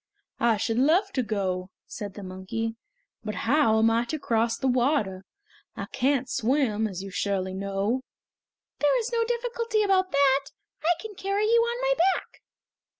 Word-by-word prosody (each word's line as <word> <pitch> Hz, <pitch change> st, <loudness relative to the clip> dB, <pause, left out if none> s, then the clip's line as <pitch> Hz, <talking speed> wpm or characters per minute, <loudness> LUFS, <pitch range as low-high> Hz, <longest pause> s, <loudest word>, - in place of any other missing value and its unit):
"I 235 Hz, -2 st, +3 dB
should 225 Hz, +3 st, 0 dB
love 345 Hz, +9 st, +3 dB
to 260 Hz, -, 0 dB
go," 190 Hz, -5 st, -2 dB, 0.2 s
said 205 Hz, -3 st, -7 dB
the 205 Hz, -, -8 dB
monkey, 190 Hz, +5 st, -4 dB, 0.5 s
"but 215 Hz, -2 st, -4 dB
how 235 Hz, -3 st, +4 dB
am 225 Hz, +1 st, +4 dB
I 230 Hz, +1 st, +2 dB
to 310 Hz, -, -3 dB
cross 230 Hz, -4 st, 0 dB
the 265 Hz, -, -1 dB
water? 240 Hz, -7 st, +1 dB, 0.5 s
I -, -, -4 dB
can't 265 Hz, 0 st, +1 dB
swim, 225 Hz, -2 st, +1 dB
as 190 Hz, -2 st, -6 dB
you 195 Hz, -, -7 dB
surely 190 Hz, 0 st, -1 dB
know!" 200 Hz, +5 st, -1 dB, 0.8 s
"There 295 Hz, +12 st, +3 dB
is 470 Hz, +1 st, -3 dB
no 460 Hz, 0 st, +2 dB
difficulty 470 Hz, -2 st, -1 dB
about 380 Hz, -2 st, +2 dB
that. 275 Hz, -1 st, +3 dB, 0.4 s
I 345 Hz, +2 st, +3 dB
can 435 Hz, +3 st, -7 dB
carry 395 Hz, +2 st, -1 dB
you 465 Hz, +2 st, +4 dB
on 475 Hz, +1 st, -1 dB
my -, -, +3 dB, 0.2 s
back." -, -, -9 dB
245 Hz, 165 wpm, -26 LUFS, -, 0.8 s, how